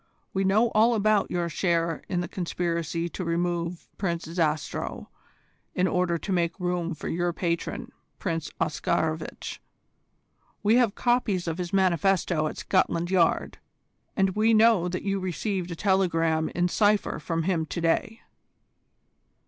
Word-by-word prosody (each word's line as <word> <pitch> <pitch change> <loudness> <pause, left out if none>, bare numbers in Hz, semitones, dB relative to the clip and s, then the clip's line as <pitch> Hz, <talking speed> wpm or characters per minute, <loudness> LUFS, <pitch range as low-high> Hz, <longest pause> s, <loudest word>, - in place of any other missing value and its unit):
We 195 - +1
know 210 +5 +3
all 230 +2 +4
about 210 -1 +2
your 175 -1 -1
share 170 -1 0
in 180 -2 0
the 175 - -3
conspiracy 170 -2 -2
to 185 - -5
remove 170 0 -2
Prince 170 -4 -1
Zastrow 160 -2 -2 0.7
in 180 - +2
order 180 -2 +1
to 195 - -5
make 170 0 0
room 175 -2 -1
for - - -7
your 175 +1 0
patron 170 -1 -3 0.3
Prince 165 -5 -3
Oscarovitch. 155 +1 -2 1.0
We 215 +3 +5
have 235 -5 +3
copies 230 -8 +1
of 165 +2 -2
his 175 -1 -3
manifesto 185 -3 +2
at - - -6
Scotland 175 -2 +1
Yard, 175 -3 +2 0.6
and 195 -1 +3
we 220 +3 +3
know 215 -5 +5
that 180 - -4
you 195 0 0
received 185 0 -2
a 170 - -4
telegram 165 -4 +1
in 175 0 +2
cypher 205 -2 +2
from 165 +1 -2
him 165 -3 0
to 170 - -4
day." 170 +7 0
175 Hz, 140 wpm, -26 LUFS, 170-195 Hz, 1.0 s, We